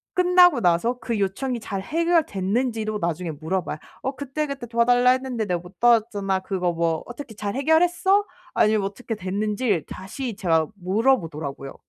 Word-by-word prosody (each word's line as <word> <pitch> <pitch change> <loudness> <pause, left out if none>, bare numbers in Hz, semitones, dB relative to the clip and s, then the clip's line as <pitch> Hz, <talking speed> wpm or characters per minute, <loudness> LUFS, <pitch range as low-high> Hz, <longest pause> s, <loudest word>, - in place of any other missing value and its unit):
끝나고 360 -6 +5
나서 180 +8 +2
그 230 -2 -2
요청이 235 +6 -1
잘 200 -2 -4
해결됐는지도 225 - 0
나중에 170 -1 -2
물어봐요. 160 +3 -3 0.2
"어 265 +1 -3
그때, 285 +3 -3
그때 275 -3 -5
도와달라 245 +2 +3
했는데 255 -3 -1
내가 180 -3 -1
못 180 +1 -15
도왔잖아. 215 -5 +3
그거 185 -2 -1
뭐 165 -1 0
어떻게 245 -2 -9
잘 205 -1 -3
해결했어?" 350 +7 +3 0.3
아니면 215 -1 +3
어떻게 210 +4 -4
됐는지를 205 - -1
다시 220 +5 -6
제가 165 -6 +2
물어보더라고요. 175 - -1
215 Hz, 375 characters per minute, -24 LUFS, 185-260 Hz, 0.3 s, 끝나고